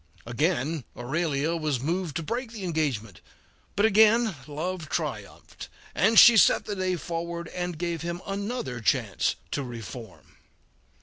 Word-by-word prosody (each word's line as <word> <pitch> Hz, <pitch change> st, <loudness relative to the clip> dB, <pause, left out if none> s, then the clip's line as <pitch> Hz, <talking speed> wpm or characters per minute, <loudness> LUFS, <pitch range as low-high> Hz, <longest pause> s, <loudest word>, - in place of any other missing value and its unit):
Again 150 Hz, +3 st, -1 dB
Aurelia 150 Hz, +4 st, -1 dB
was 155 Hz, -5 st, -1 dB
moved 165 Hz, +3 st, -2 dB
to 165 Hz, -, -2 dB
break 235 Hz, -, -4 dB
the 220 Hz, -4 st, -8 dB
engagement, 140 Hz, -, -2 dB, 0.5 s
but 205 Hz, -, +3 dB
again 220 Hz, 0 st, +4 dB
love 160 Hz, +2 st, -4 dB
triumphed, -, -, -5 dB, 0.2 s
and 220 Hz, +7 st, +3 dB
she 235 Hz, -2 st, +10 dB
set -, -, +5 dB
the 205 Hz, -, -3 dB
day 185 Hz, -1 st, 0 dB
forward 170 Hz, 0 st, -5 dB
and 175 Hz, -2 st, -4 dB
gave 170 Hz, 0 st, -3 dB
him 170 Hz, +1 st, -4 dB
another 200 Hz, -, -4 dB
chance -, -, +1 dB, 0.2 s
to -, -, -1 dB
reform. 115 Hz, -3 st, -9 dB
170 Hz, 135 wpm, -26 LUFS, 145-190 Hz, 0.5 s, she